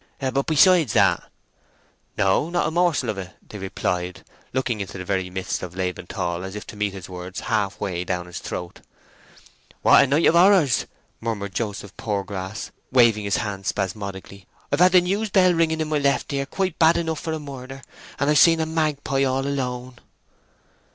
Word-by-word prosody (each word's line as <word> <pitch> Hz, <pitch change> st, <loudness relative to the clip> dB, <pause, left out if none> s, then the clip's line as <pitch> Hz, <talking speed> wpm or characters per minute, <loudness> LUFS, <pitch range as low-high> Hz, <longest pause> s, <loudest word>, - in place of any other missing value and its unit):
"But 135 Hz, 0 st, -1 dB
besides 160 Hz, -, +5 dB
that?" -, -, +3 dB, 0.9 s
"No—not 145 Hz, -, +1 dB
a -, -, -2 dB
morsel 170 Hz, -7 st, +1 dB
of 100 Hz, -, -7 dB
it!" 95 Hz, -1 st, -8 dB
they 105 Hz, -, -9 dB
replied, 90 Hz, -2 st, -3 dB, 0.3 s
looking 125 Hz, -4 st, -1 dB
into 95 Hz, 0 st, -6 dB
the 90 Hz, -, -6 dB
very 95 Hz, -1 st, -1 dB
midst 95 Hz, 0 st, -3 dB
of 90 Hz, -1 st, -7 dB
Laban 90 Hz, -1 st, -3 dB
Tall 90 Hz, -3 st, -3 dB
as 95 Hz, +1 st, -7 dB
if 105 Hz, -, -6 dB
to -, -, -10 dB
meet 105 Hz, -1 st, -1 dB
his 95 Hz, -1 st, -8 dB
words 90 Hz, 0 st, -7 dB
half 105 Hz, -4 st, -1 dB
way 90 Hz, -3 st, -2 dB
down 90 Hz, -1 st, -3 dB
his 90 Hz, -, -7 dB
throat. 90 Hz, -1 st, -6 dB, 1.0 s
"What -, -, +7 dB
a -, -, +1 dB
night 145 Hz, +5 st, +2 dB
of -, -, +5 dB
horrors!" 175 Hz, -, +4 dB, 0.3 s
murmured 105 Hz, -4 st, -4 dB
Joseph 105 Hz, -3 st, -4 dB
Poorgrass, 100 Hz, -1 st, -4 dB, 0.2 s
waving 115 Hz, -5 st, +4 dB
his 100 Hz, -, +1 dB
hands 100 Hz, -3 st, -4 dB
spasmodically. 100 Hz, -1 st, -4 dB, 0.2 s
"I've 145 Hz, -, +1 dB
had 180 Hz, +1 st, +6 dB
the 180 Hz, -, +7 dB
news 200 Hz, +5 st, -1 dB
bell 185 Hz, -2 st, +4 dB
ringing 160 Hz, -1 st, +1 dB
in 155 Hz, -, -2 dB
my 155 Hz, -1 st, +1 dB
left 140 Hz, 0 st, 0 dB
ear 140 Hz, 0 st, -1 dB
quite 185 Hz, +1 st, -2 dB
bad 165 Hz, 0 st, +5 dB
enough 160 Hz, -2 st, -2 dB
for 160 Hz, -, -4 dB
a 160 Hz, -, -3 dB
murder, 135 Hz, -2 st, -9 dB, 0.3 s
and 140 Hz, -, 0 dB
I've 150 Hz, 0 st, +4 dB
seen 165 Hz, -1 st, +6 dB
a 160 Hz, -, +1 dB
magpie 150 Hz, -4 st, 0 dB
all 135 Hz, 0 st, 0 dB
alone!" 125 Hz, -3 st, -3 dB
120 Hz, 185 wpm, -23 LUFS, 95-155 Hz, 1.0 s, What